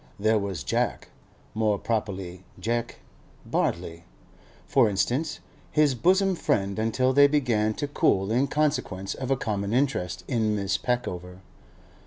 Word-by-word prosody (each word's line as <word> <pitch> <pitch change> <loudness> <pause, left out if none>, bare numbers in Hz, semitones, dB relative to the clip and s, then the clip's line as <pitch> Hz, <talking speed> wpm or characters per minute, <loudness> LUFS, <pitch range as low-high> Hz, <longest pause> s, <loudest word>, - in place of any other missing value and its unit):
There 110 +1 +3
was 95 -6 -4
Jack—more 105 +9 -2
properly 95 -5 -3 0.2
'Jeck'—Bartley, 90 -7 -4 0.6
for 110 - +4
instance, 130 +10 -1 0.3
his 150 -3 +3
bosom 190 - +3
friend 100 - 0
until 130 +4 +1
they 140 +1 +7
began 120 -7 +1
to 145 - -3
cool 100 -7 +1
in 130 +5 +2
consequence 140 -11 -1
of 130 -1 -5
a 135 - +2
common 100 -2 -2
interest 125 - 0
in 110 -5 +1
Miss 100 -1 -1
Peckover. 90 -7 -3
110 Hz, 120 wpm, -26 LUFS, 100-135 Hz, 0.6 s, they